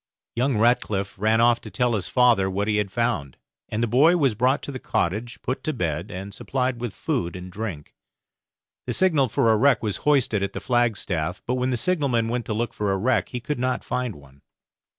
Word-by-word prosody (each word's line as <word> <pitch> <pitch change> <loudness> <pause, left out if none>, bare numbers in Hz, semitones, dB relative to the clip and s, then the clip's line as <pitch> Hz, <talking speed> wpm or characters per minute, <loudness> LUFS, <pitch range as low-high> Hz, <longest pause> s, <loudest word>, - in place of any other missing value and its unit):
Young 125 0 +1
Ratcliff 105 -3 +1
ran 110 +2 +3
off 120 0 +4
to - - -9
tell 125 -1 0
his 100 -4 -1
father 120 -4 +3
what 100 +2 -1
he 105 -1 +1
had 105 -2 0
found; 115 - -1 0.3
and 110 +2 -1
the - - +2
boy 150 +10 +5
was 135 -7 +2
brought 130 +6 +1
to - - -5
the 130 - -6
cottage, 110 +6 -2
put 130 - -3
to 155 - -1
bed, 85 - -2
and 100 0 -7
supplied 125 +1 -2
with 120 -3 -3
food 115 - -2
and 90 0 -8
drink. 95 -7 -6 0.9
The - - -1
signal 160 -8 +3
for 115 0 +2
a 110 - +4
wreck 130 +1 +3
was 105 -3 -1
hoisted 135 -8 +2
at 100 0 -2
the - - -4
flagstaff, 100 -8 -1
but 125 - -1
when 125 0 0
the 125 - 0
signallman 135 -9 +1
went 120 0 -2
to 110 - -1
look 115 +1 -2
for 105 -2 -1
a 95 - +1
wreck 125 +7 +1
he 125 - -4
could 145 +3 -4
not 130 +1 -1
find 125 -4 -2
one. 70 -1 -17
115 Hz, 215 wpm, -24 LUFS, 100-125 Hz, 0.9 s, boy